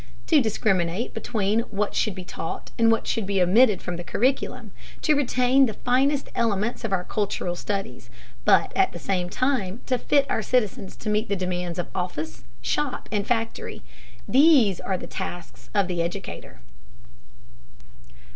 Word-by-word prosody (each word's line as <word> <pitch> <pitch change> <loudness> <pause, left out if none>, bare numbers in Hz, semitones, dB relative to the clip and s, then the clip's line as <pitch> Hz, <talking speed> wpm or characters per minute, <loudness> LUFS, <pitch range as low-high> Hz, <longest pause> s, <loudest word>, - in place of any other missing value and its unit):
To 310 -4 +5
discriminate 200 -3 0
between 220 -2 0
what 205 0 -1
should 215 -5 0
be 185 - -6
taught 165 -2 -6
and 230 0 +5
what 225 - +1
should 220 -4 -1
be 200 -1 +1
omitted 200 +3 +4
from 175 -1 -3
the 175 - -6
curriculum, 260 +9 -1 0.3
to 310 - +4
retain 265 -1 +3
the 220 - -5
finest 270 +3 +1
elements 225 +1 0
of 225 - -2
our 185 -2 +1
cultural 195 -3 -2
studies, 185 - -4 0.3
but - - +4
at - - +3
the - - -6
same 180 -2 -1
time 240 -3 -1
to 255 -2 0
fit 280 -1 +3
our 225 - 0
citizens 215 -4 -1
to 215 - -5
meet 210 +2 0
the 200 - +1
demands 180 -2 -3
of 175 - -1
office, 175 -4 -4 0.2
shop, - - -2
and 205 -1 -1
factory, 225 -2 -2 0.4
these 265 - +5
are 190 - -2
the - - -7
tasks 130 -9 -7
of 195 +5 +2
the 175 -2 -1
educator. 170 +1 -6
205 Hz, 160 wpm, -25 LUFS, 180-245 Hz, 0.4 s, To